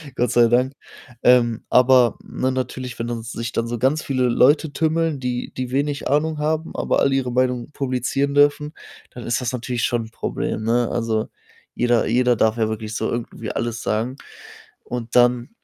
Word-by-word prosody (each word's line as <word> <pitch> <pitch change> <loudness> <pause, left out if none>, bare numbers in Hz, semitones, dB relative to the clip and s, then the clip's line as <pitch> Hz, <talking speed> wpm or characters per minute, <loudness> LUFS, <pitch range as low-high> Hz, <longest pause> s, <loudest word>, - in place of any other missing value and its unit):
Gott 125 - 0
sei 120 -1 +5
Dank. 125 +3 +2 0.5
Ähm, 120 -2 +4
aber, 125 -2 +5
ne, 130 0 -2
natürlich, 130 -1 -4
wenn 115 - -2
dann 115 -1 -4
sich 115 0 -5
dann 115 - 0
so 120 -1 -4
ganz 145 +5 +1
viele 130 -2 -1
Leute 145 +5 +3
tümmeln, 160 -2 0
die 125 -1 -3
die 125 -1 -4
wenig 140 +1 -1
Ahnung 150 +2 +1
haben, 155 +2 -2
aber - - 0
alle 140 -1 +2
ihre 130 -2 -1
Meinung 125 0 0
publizieren 135 +1 -1
dürfen, 145 +1 +3 0.4
dann 120 - -9
ist 120 +2 0
das 125 0 -2
natürlich 120 -1 -3
schon 120 -3 0
'n - - -19
Problem, 110 - -3
ne? 120 +2 +1
Also, 115 -2 -1 0.5
jeder 120 -2 +2
jeder 125 +2 +3
darf 110 +1 +2
ja 110 - +1
wirklich 110 0 -5
so - - -1
irgendwie 115 -2 -5
alles 120 -1 -3
sagen 115 +5 -2 0.7
und 120 -1 -6
dann 120 0 +3
125 Hz, 180 wpm, -21 LUFS, 115-135 Hz, 0.7 s, sei